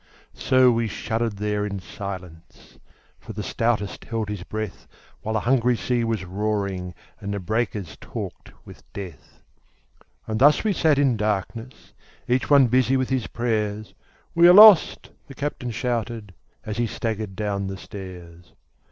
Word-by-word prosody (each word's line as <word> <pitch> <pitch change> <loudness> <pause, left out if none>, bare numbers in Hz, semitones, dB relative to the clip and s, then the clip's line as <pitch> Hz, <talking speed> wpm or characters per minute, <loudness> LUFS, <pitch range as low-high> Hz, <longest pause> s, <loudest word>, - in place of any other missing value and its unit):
So 130 -1 +4
we 115 -1 0
shuddered 115 +2 -2
there 105 0 -1
in 100 -1 -3
silence, 90 -3 -9 0.4
For 110 - -10
the 105 0 -5
stoutest 110 -3 -1
held 110 -2 -3
his 105 -3 -4
breath, 110 +1 -6 0.3
While 110 - -3
the 110 - +1
hungry 125 -1 +2
sea 120 0 -1
was 115 -5 -2
roaring 100 -2 -3 0.2
And 100 - -5
the 100 - -2
breakers 105 -3 -2
talked - - -7
with - - -13
death. 95 -4 -10 0.8
As 110 - -2
thus 145 +5 +5
we 215 -2 +1
sat 155 -5 +2
in 135 -5 +2
darkness 105 +4 -4 0.3
Each 125 +1 0
one 140 -2 +7
busy 130 +2 +2
with 130 -1 -1
his 130 -3 -1
prayers, 110 -3 -2 0.4
"We 170 +1 +6
are 175 - +9
lost!" 210 -4 +7 0.2
the 135 - -11
captain 140 -3 -4
shouted, 115 -3 -3 0.3
As 110 0 -4
he 120 -1 +1
staggered 110 -3 -4
down 100 -1 -2
the 95 0 -5
stairs. 90 -4 -11
110 Hz, 150 wpm, -24 LUFS, 100-125 Hz, 0.8 s, are